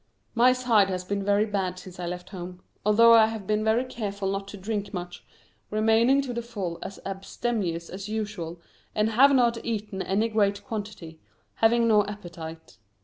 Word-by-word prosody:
My 240 +2 +5
side 235 -6 +3
has 185 -1 -2
been 200 +1 -2
very 205 +1 +3
bad 190 -4 -2
since 185 -1 -11
I 175 - -3
left 180 +1 -6
home, 180 -1 -8 0.2
although 230 +3 +6
I 225 -1 +7
have 220 -3 -6
been 215 +2 0
very 220 +4 +2
careful 200 -5 -3
not 195 0 -3
to 200 - -8
drink 205 +1 -4
much, 175 0 -6 0.5
remaining 225 +6 +3
to 255 -2 -4
the 235 - -2
full 200 -8 -5
as 195 - -7
abstemious 195 -3 -3
as 195 +3 -7
usual, 205 -6 -4 0.4
and 215 +1 +2
have 270 +5 +6
not 240 -3 +2
eaten 210 -4 -3
any 200 +4 +1
great 205 -3 +1
quantity, 205 -8 -7 0.4
having 230 +1 +4
no 210 -2 +5
appetite. 165 - -9
205 Hz, 175 wpm, -26 LUFS, 185-225 Hz, 0.5 s, I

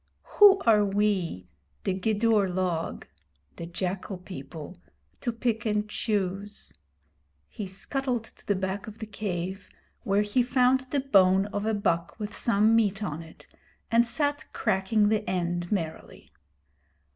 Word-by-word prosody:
Who 405 -2 +9
are 215 -3 +5
we, 195 - 0 0.4
the - - 0
Gidur 210 +1 +2
log 180 -3 -2 0.5
[the 170 - -6
jackal 185 +2 -4
people], 175 -1 -9 0.4
to 240 - -1
pick 230 -1 -1
and 210 -1 0
choose?' 205 - -2 0.7
He 205 - -6
scuttled 245 +5 -2
to - - -15
the 205 - +2
back 190 +2 -3
of 215 0 -9
the 225 - -6
cave, 195 -2 -4 0.3
where 200 +1 +2
he 210 +5 +2
found 255 +1 +2
the 280 +1 0
bone 195 -7 +4
of 205 +1 -2
a 220 - +1
buck 170 -1 -1
with 210 0 -5
some 220 0 +3
meat 210 -2 +2
on 160 -4 -3
it, 160 -1 -14 0.5
and 235 +1 +4
sat 290 +3 0
cracking 205 0 +2
the 215 -1 +1
end 175 -1 -2
merrily. 165 -6 -4
205 Hz, 140 wpm, -27 LUFS, 185-225 Hz, 0.7 s, Who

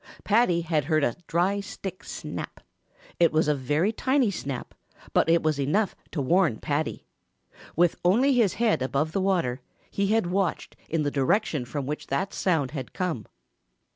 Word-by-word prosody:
Paddy 205 -6 +3
had 160 -4 0
heard 155 -1 +2
a 120 - +1
dry 185 +4 +1
stick 195 -2 -7
snap. - - -6 0.6
It 170 -2 +5
was 155 0 +2
a 150 - +4
very 150 - +1
tiny 260 0 +1
snap, 140 -8 -5 0.4
but - - +3
it 170 0 +4
was 155 -2 +1
enough 185 +10 +1 0.2
to 145 - -2
warn 170 - +3
Paddy. 145 +5 -2 0.7
With 175 0 +3
only 240 +11 +4
his 230 -7 +3
head 225 - +2
above 140 +5 -1
water 180 -10 +1 0.3
he 200 0 0
had 220 0 +2
watched 190 -1 -1
in 160 -1 0
the 145 - 0
direction 145 - +1
from 140 +2 -4
which 150 +3 -4
that 140 +9 -1
sound 160 -8 0
had 135 -5 -6
come. 165 - -3
165 Hz, 165 wpm, -26 LUFS, 145-195 Hz, 0.7 s, It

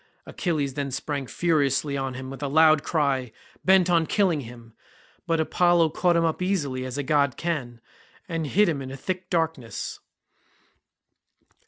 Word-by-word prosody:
Achilles 150 -7 -2
then 140 0 -3
sprang 140 0 -4
furiously 145 -3 +1
on 135 -2 -3
him 130 0 -7
with 135 - -9
a 145 - -1
loud 155 +1 +5
cry, 140 -7 0 0.3
bent 190 -1 +5
on 170 -3 +2
killing 185 -8 +1
him, 115 -2 -12 0.5
but 165 -1 +1
Apollo 175 +1 +3
caught 175 +2 +2
him 165 0 +3
up 160 +2 -1
easily 145 -9 -1
as 130 +1 -5
a 145 - -1
god 140 -2 +1
can, 140 -9 -3 0.5
and 165 -4 -3
hid 210 +8 +3
him 155 -5 -1
in 130 - -6
a 135 - -7
thick 185 +5 -4
darkness. 160 -9 -2
150 Hz, 160 wpm, -25 LUFS, 135-170 Hz, 0.5 s, loud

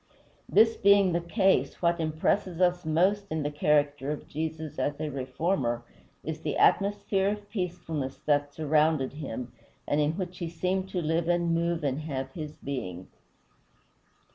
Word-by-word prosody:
This 225 0 +5
being 200 -2 +5
the 170 - +1
case, 190 +3 +2
what 170 0 +2
impresses 165 +3 0
us 180 -2 +2
most 190 +6 +2
in 155 -1 -2
the 145 - -1
character 145 -1 +1
of 150 - -4
Jesus, 160 0 -4
as 145 0 -1
a 155 - -2
reformer, 130 -2 -1 0.4
is - - -5
the - - -2
atmosphere 200 -1 +3
of 205 0 -4
peacefulness 165 - -3
that 145 -1 +2
surrounded 155 -2 +2
him, 125 -5 -6 0.4
and 145 +1 +2
in 150 +1 +1
which 180 0 -5
he 170 - -3
seemed 185 +3 -1
to 180 -3 -2
live 165 +2 0
and 175 -1 +2
move 170 -1 0
and 140 0 0
have 135 -4 -4
his 155 0 -7
being. 95 -10 -5
160 Hz, 155 wpm, -28 LUFS, 145-180 Hz, 0.4 s, This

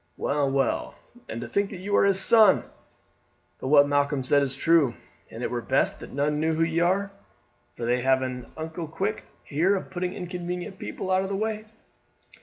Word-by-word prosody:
Well, 140 -1 0
well, 135 -1 -1 0.3
and 115 - -5
to 120 - -5
think 200 +11 0
that 195 - -8
you 200 +3 -2
are - - +5
his 195 -1 +4
son! 215 -1 +6 1.0
But - - -5
what 145 0 +6
Malcolm 145 -1 +1
said 145 +2 +3
is 135 -1 -1
true, 155 -4 +3 0.3
and - - -8
it - - -2
were - - -2
best - - +1
that - - -10
none 150 +2 0
knew 160 +1 +1
who 165 - +2
ye 165 0 0
are, 190 +3 +1 0.6
for 120 - -5
they 125 +1 +1
have 130 +1 +2
an 125 -1 -6
unco 160 +1 -5
quick 190 +7 -2
way - - -15 0.2
here 170 +7 +1
of 190 - -5
putting 180 0 -3
inconvenient 180 +1 -5
people 185 - -5
out 185 0 +3
of 190 - -4
the 200 - -2
way." 215 +1 -2
165 Hz, 205 wpm, -26 LUFS, 140-190 Hz, 1.0 s, son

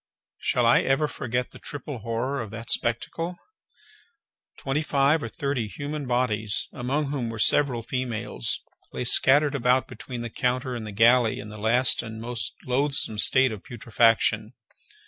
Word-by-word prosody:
Shall 125 - +1
I 115 - +6
ever 135 +3 +2
forget 125 -3 -3
the - - -13
triple 145 -2 -5
horror 120 +5 -2
of 110 - -6
that 115 +2 -7
spectacle? 165 +9 -2 1.2
Twenty 135 +2 -1
five 145 +1 +2
or 115 - -3
thirty 135 -3 -2
human 145 +5 -5
bodies, 110 -4 0
among 135 +4 -1
whom 130 -5 -2
were 115 - -6
several 120 +1 +3
females, 120 - -3 0.3
lay - - -3
scattered 145 +4 +4
about 130 -1 +2
between 120 0 -7
the 120 - -6
counter 125 +1 -1
and 115 -3 -5
the - - -6
galley 115 +2 +4
in 105 - -8
the 105 0 -9
last 120 +4 +3
and 110 -2 -8
most 115 -5 -4
loathsome 130 -4 0
state 130 +2 +4
of 105 -3 -7
putrefaction. 115 -1 +1
125 Hz, 155 wpm, -26 LUFS, 115-135 Hz, 1.2 s, I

